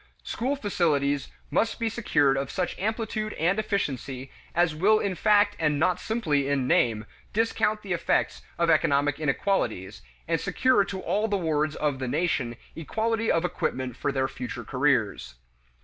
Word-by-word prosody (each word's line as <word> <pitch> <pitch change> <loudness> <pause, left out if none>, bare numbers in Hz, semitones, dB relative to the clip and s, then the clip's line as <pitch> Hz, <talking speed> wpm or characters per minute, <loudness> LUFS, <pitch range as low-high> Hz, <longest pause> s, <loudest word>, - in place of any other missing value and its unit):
School 260 +5 -2
facilities 150 - 0 0.2
must 225 - +1
be 230 - 0
secured 160 - +2
of 135 0 -2
such 180 -2 -2
amplitude 215 +1 -2
and 175 +6 +1
efficiency 135 - -3 0.2
as 170 -2 +3
will 200 +8 +4
in 200 -3 -1
fact 205 +2 +3
and 150 -2 +1
not 180 +4 +2
simply 155 -12 0
in 140 -2 +1
name 110 -4 +2 0.3
discount 215 -1 +1
the 190 -3 -2
effects 170 - 0 0.2
of 170 -1 +3
economic 145 -1 +2
inequalities, 135 - -1 0.3
and - - 0
secure 255 -5 +3
to 195 -1 -5
all 210 +2 0
the 205 -2 0
wards 155 -3 0
of 145 -3 -1
the 130 - -3
nation 140 -5 0 0.2
equality 225 +7 -1
of 165 +1 +1
equipment 130 -8 -2
for 140 - -1
their 130 -1 0
future 125 -2 -6
careers. 125 - 0
165 Hz, 155 wpm, -26 LUFS, 135-205 Hz, 0.3 s, will